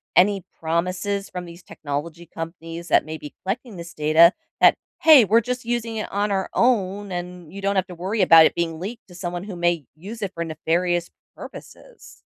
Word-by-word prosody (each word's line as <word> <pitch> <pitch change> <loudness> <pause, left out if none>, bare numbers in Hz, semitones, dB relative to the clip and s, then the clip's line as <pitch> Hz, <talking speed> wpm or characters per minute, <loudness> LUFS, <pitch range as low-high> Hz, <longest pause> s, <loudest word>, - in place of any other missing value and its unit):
any 195 0 +4 0.2
promises 185 +5 -2
from 180 -1 -6
these 170 +1 -12
technology 155 +4 -6
companies 165 +1 -8
that - - +3
may 160 0 -6
be 150 -1 -11
collecting 215 +2 -4
this 170 0 -9
data 155 +3 +5 0.3
that, - - +7 0.3
"Hey, 305 -7 +8
we're 225 +4 +4
just 250 +1 -4
using 230 -2 -2
it 215 - -4
on 205 +1 0
our 190 -1 -1
own 205 -5 +1
and 175 -1 -7
you 200 - -7
don't 200 0 0
have 190 -1 +2
to 180 - -9
worry 195 +5 -2
about 165 -2 +8
it - - -6
being 165 -2 -2
leaked 220 +5 -7
to - - -13
someone 175 0 -5
who 200 -3 -7
may 175 -4 0
use 210 +7 -9
it 190 -1 -4
for 170 - -3
nefarious 170 +2 -1 0.2
purposes." - - -13
180 Hz, 195 wpm, -23 LUFS, 170-205 Hz, 0.3 s, Hey